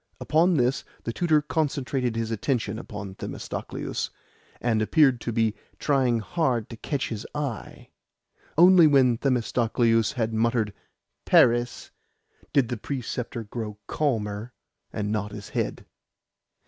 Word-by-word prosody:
Upon 170 +3 +3
this 125 -1 +1 0.2
the 115 - -3
tutor 155 -2 +2
concentrated 135 -6 -1
his 115 0 -2
attention 110 -1 -1
upon 100 -4 -7
Themistocleus, - - -4 0.5
and 115 -2 +1
appeared 130 +1 +4
to 120 - -3
be 110 -1 +1 0.2
trying 130 -5 +2
hard 125 - -1
to - - -6
catch 140 +3 -2
his 110 -1 -4
eye. 140 - -5 0.7
Only 175 -1 +8
when 130 -5 +4
Themistocleus 115 -3 +2
had 115 -2 -1
muttered 110 -2 +1 0.5
"Paris" 120 +1 +3 0.6
did 135 -5 +3
the 120 - -2
preceptor 125 -1 -4
grow 105 -1 -6
calmer, 110 -5 -2 0.4
and 105 0 -2
nod 105 -1 -2
his 100 -1 -8
head. - - -3
120 Hz, 120 wpm, -26 LUFS, 110-140 Hz, 0.7 s, Only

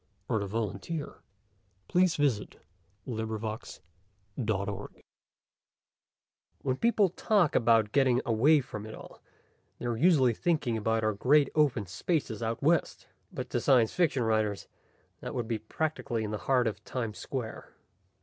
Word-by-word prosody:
net 110 - +2
BESIDE 100 -1 -4 0.3
STILL 160 -3 -5 0.7
WATERS 180 -1 +4 0.9
BY 110 -3 -3 0.2
ROBERT 110 +1 -4
SHECKLEY 100 +3 -6 1.6
_When 130 -1 0
people 220 -4 +3
talk 185 -2 +2
about 115 -2 +3
getting 130 -2 +3
away 135 +7 +4
from 110 -4 -8
it 110 - -8
all, - - -13 0.6
they - - -7
are 120 -1 0
usually 135 -3 +4
thinking 145 -4 0
about 110 +1 0
our 110 0 +2
great 140 +7 +3
open 140 -9 +2
spaces 110 - -2
out 115 +3 -3
west. 165 +3 +1 0.2
But - - -6
to - - 0
science 120 -4 +4
fiction 155 -8 +1
writers, 110 -2 0 0.5
that - - -6
would 120 -3 -2
be 115 -2 -2
practically 120 -2 -3
in 105 - -4
the 105 - -3
heart 130 -2 +4
of 105 -2 -3
Times 115 -4 -4
Square. 125 -5 -6
115 Hz, 140 wpm, -29 LUFS, 110-145 Hz, 1.6 s, WATERS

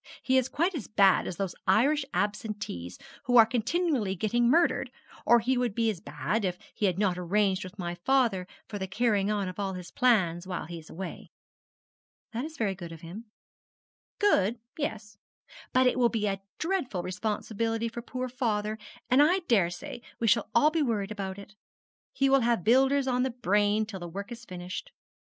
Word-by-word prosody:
He 260 - +2
is 260 0 -2
quite 345 +5 0
as 285 - -5
bad 195 -3 +4
as - - -4
those 195 -3 -2
Irish 270 +10 +4
Absentees 205 - -3 0.3
who 245 0 +4
are 225 - +10
continually 240 - 0
getting 235 +5 +1
murdered; 335 +6 +3 0.4
or 240 - +7
he 255 +2 +1
would 240 -5 -1
be 230 -1 +2
as 190 - -7
bad, 150 +9 -2
if 180 -2 -1 0.2
he 205 - +1
had 185 -2 0
not 190 -3 +1
arranged 190 +1 +1
with 185 +2 -10
my 175 -3 -3
father 195 -1 +1 0.2
for 205 - -6
the 190 - -3
carrying 205 -1 +1
on 205 -2 0
of 185 +2 -7
all 195 -1 -1
his 180 -1 -8
plans 185 -8 +2
while 180 -2 -4
he 170 0 -7
is 160 - -15
away.' 185 +1 -7 1.0
'That 240 +5 -2
is 315 0 -9
very 205 -4 0
good 175 -3 -9
of 165 -1 -10
him.' 185 +7 -9 0.9
'Good, 235 - +3 0.2
yes; 215 -8 -4 0.5
but 255 0 +4
it 250 - +2
will 240 -1 +5
be 220 -3 -1
a 195 -1 -1 0.2
dreadful 315 - -1
responsibility 220 +4 -2
for 230 +1 -6
poor 255 +1 -4
father, 220 -4 -1 0.3
and 255 +3 +5
I 355 +6 +4
daresay 180 0 0 0.2
we 235 - 0
shall 230 +1 +3
all 295 +6 +5
be 325 0 +1
worried 215 -7 -1
about 195 -2 -4
it. 200 +1 -11 0.6
He 275 - +1
will 270 0 +4
have 235 -6 +1
builders 265 +4 +4
on 250 -1 +1
the 260 - +1
brain 210 -2 +1
till 205 -3 -7
the 175 - -6
work 200 +6 -7
is 235 0 -8
finished. 180 -1 -7
215 Hz, 190 wpm, -28 LUFS, 190-245 Hz, 1.0 s, are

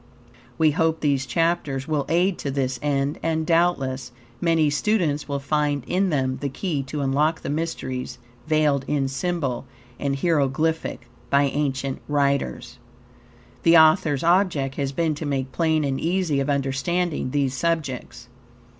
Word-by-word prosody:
We 155 -1 +4
hope 160 +1 +1
these 140 -3 +1
chapters 145 -2 0
will 150 -3 -1
aid 175 +3 +2
to 140 - -3
this 130 -2 -1
end, 140 0 0
and 160 -1 0
doubtless 135 -7 +1 0.3
many 165 -2 +3
students 155 -3 0
will 140 - -1
find 145 -1 0
in 190 +1 +1
them 130 -4 0
the 140 - -1
key 145 +1 -2
to 145 +2 -3
unlock 145 +4 +1
the - - -4
mysteries 130 -5 -3 0.3
veiled 150 -3 +2
in 140 -2 0
symbol 135 -4 -2 0.3
and 140 -1 -1
hieroglyphic 155 -3 0 0.2
by 140 0 +4
ancient 135 -1 -1
writers. 140 -4 -1 0.8
The 165 0 +6
author's 155 -3 +4
object 170 -6 +2
has 140 -1 -2
been 160 +2 0
to 150 +1 -5
make 135 -2 -2
plain 160 -1 +1
and 135 -2 -1
easy 170 -4 +1
of 135 +1 -1
understanding 140 +3 -1
these 135 -1 0
subjects. 135 -6 -3
145 Hz, 145 wpm, -23 LUFS, 135-165 Hz, 0.8 s, The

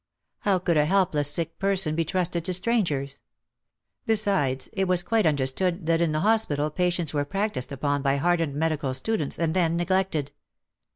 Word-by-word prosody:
How 200 -2 +1
could 175 -3 0
a 150 - +4
helpless 160 -6 +2
sick 165 +1 -2
person 195 -5 +1
be 165 +1 0
trusted 175 0 -1
to 185 - 0
strangers! 170 - -1 0.9
Besides, 195 -12 +1
it 190 -1 -1
was 180 -1 +2
quite 220 -1 +1
understood 155 +5 0
that 165 0 +1
in 170 -2 +1
the 155 0 -1
hospital 180 -9 +1
pa 180 +4 0
tients 175 -3 -1
were 145 -1 0
practised 195 -5 -3
upon 145 +1 -1
by 135 0 +1
hardened 165 0 0
medical 150 -4 -1
students 155 +1 -1
and 165 -1 0
then 170 -2 +1
neglected. 175 -4 -1
165 Hz, 170 wpm, -25 LUFS, 145-190 Hz, 0.9 s, a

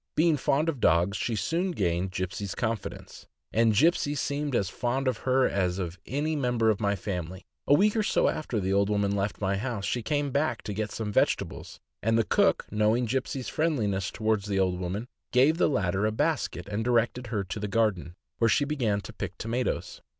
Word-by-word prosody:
Being 160 0 +4
fond 145 +3 +1
of 155 -6 -1
dogs, 90 +1 +3
she 115 +1 -1
soon 165 - 0
gained 90 - 0
Gipsey' 95 +2 -3
s 95 - -5
confidence, 115 -4 -4 0.3
and 115 -1 +3
Gipsey 150 - +3
seemed 145 0 -2
as 100 - +1
fond 125 +7 -2
of 125 -3 0
her 130 0 +4
as 90 -2 0
of 90 -1 -4
any 150 +4 -1
member 120 -5 +2
of 105 - -2
my 100 -2 +1
family. 90 -1 -5 0.2
A 145 - +6
week 205 +6 +3
or 220 - +2
so 210 - +2
after 125 -7 -1
the 95 0 0
old 100 +1 +2
woman 100 -1 +1
left 100 +1 -2
my 100 -1 0
house, 110 -2 -3
she 120 - -1
came 145 +3 -1
back 140 -3 0
to 105 - -4
get 105 +1 -2
some 105 -2 -4
vege - - +4
tables, - - -8 0.2
and 115 +1 +2
the 115 - +3
cook, - - +2
knowing 110 +4 +2
Gipsey' 130 +3 -2
s - - -7
friendliness 110 - 0
toward 110 -1 0
the 100 -2 -1
old 90 -1 +1
woman, 95 +6 -3 0.2
gave 135 +6 +4
the - - +4
latter 100 -5 +1
a - - 0
basket, 140 - -1
and 105 +2 -2
directed 120 +1 +1
her 105 -3 -1
to 95 +3 -5
the 105 - -3
garden, 100 -5 0 0.2
where 115 - +4
she 145 - +3
began 120 -9 0
to - - -10
pick - - -6
tomatoes. 120 +3 -3
110 Hz, 210 wpm, -28 LUFS, 100-130 Hz, 0.3 s, A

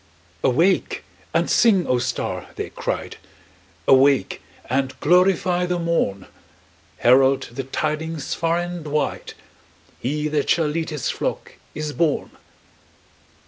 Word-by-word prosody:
"Awake 170 +9 +2 0.3
and - - +1
sing, 200 -7 +4
O 125 - +1
star!" 130 +1 -3
they - - -5
cried. - - -4 0.7
"Awake 135 -5 +4 0.3
and 130 +1 -1
glorify 180 +1 +3
the 180 0 0
morn! 165 - -1 0.7
Herald 130 +2 +4
the 130 +2 -5
tidings 155 +2 -3
far 165 0 0
and 175 -2 -4
wide 150 +1 -2 0.6
He 150 +4 -1
that 150 -1 -1
shall 165 -1 +3
lead 160 +2 -2
His 150 -5 -2
flock - - -4 0.2
is 150 0 -4
born!" 160 -3 0
150 Hz, 115 wpm, -22 LUFS, 135-170 Hz, 0.7 s, sing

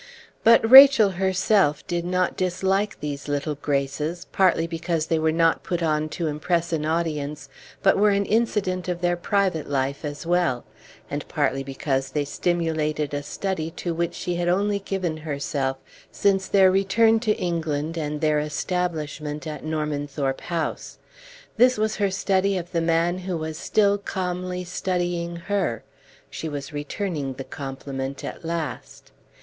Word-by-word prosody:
But 230 0 +6
Rachel 265 -5 +9
herself 190 -4 +2
did 175 -1 -2
not 180 0 0
dislike 190 +3 0
these 145 -2 -5
little 145 +1 -1
graces, 145 +4 -2
partly 180 -4 +3
because 165 -1 -2
they 165 -1 0
were 160 0 +2
not 165 0 +2
put 175 -1 -2
on 155 -1 0
to 170 - -1
impress 165 +3 -1
an 155 -1 -1
audience, 150 -4 -2 0.3
but 195 - +4
were 210 +1 +5
an 200 0 +2
incident 195 -4 0
of 175 -1 -3
their 175 0 +2
private 185 -3 0
life 140 +1 -1
as 145 +1 -5
well; 170 -8 +1 0.4
and - - -5
partly 135 - 0
because 135 0 -2
they 145 +1 -1
stimulated 155 -2 -1
a 145 - -1
study 165 +1 -3
to 175 - -2
which 170 0 -2
she 175 -1 -3
had 175 0 -1
only 200 +3 +1
given 185 -5 -3
herself 140 -3 -2 0.3
since 195 -1 +1
their 190 -2 +5
return 220 +4 +3
to 215 -2 0
England 160 -2 -2
and 150 -2 -3
their 155 -1 +2
establishment 150 -1 -3
at 155 -1 -6
Normanthorpe 145 -3 -2
House. 170 -2 -4 0.6
This 250 +1 +5
was 215 0 0
her 200 -2 +1
study 195 0 +1
of 175 -1 -6
the 170 -2 0
man 165 +2 +1
who 185 -1 -3
was 160 0 -4
still 205 +4 +2
calmly 180 -1 -3
studying 175 -1 -2
her; 170 - -2 0.5
she 160 +3 -5
was 145 +1 -6
returning 145 -1 -3
the 135 - -6
compliment 135 0 -6
at - - -7
last. 165 -5 -5
170 Hz, 155 wpm, -24 LUFS, 150-185 Hz, 0.6 s, Rachel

